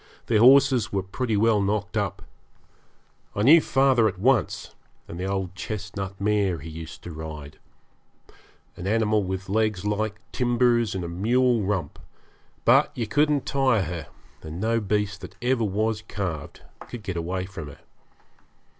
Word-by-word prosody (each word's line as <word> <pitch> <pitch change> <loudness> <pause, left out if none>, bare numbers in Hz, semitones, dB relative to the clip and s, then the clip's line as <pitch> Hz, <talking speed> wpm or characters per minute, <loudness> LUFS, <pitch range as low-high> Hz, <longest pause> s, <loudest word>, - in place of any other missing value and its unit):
Their 110 -3 +2
horses 130 -1 +5
were 95 -2 -1
pretty 110 +3 -2
well 110 0 +3
knocked 100 +2 -1
up. 100 -3 -2 1.1
I 105 - 0
knew 155 +7 +8
father 135 -5 +3
at 105 - -3
once, 120 +2 +1 0.3
and 85 - -8
the 95 - -2
old 95 -2 -2
chestnut 100 -1 -6
mare 100 -3 +1
he 80 +2 -9
used 80 0 -9
to 90 - -7
ride 75 -2 -8 1.2
an 90 - -6
animal 110 -1 +2
with 95 0 -4
legs 105 -1 0
like 105 0 -1
timbers 120 -3 +2
and 95 - -3
a - - -4
mule 115 +7 +2
rump; 95 -2 -2 0.7
but - - +5
you 120 - -1
couldn't 145 +3 +1
tire 130 -7 +2
her, 80 -2 -5 0.3
and 80 +2 -7
no 115 +3 +1
beast 105 -1 -1
that 90 - -10
ever 125 -1 +1
was 105 +2 0
calved 90 -9 -5 0.3
could 120 -3 -8
get 95 -3 -4
away 90 +2 -2
from 90 -5 -8
her. 70 - -12
105 Hz, 155 wpm, -25 LUFS, 95-115 Hz, 1.2 s, knew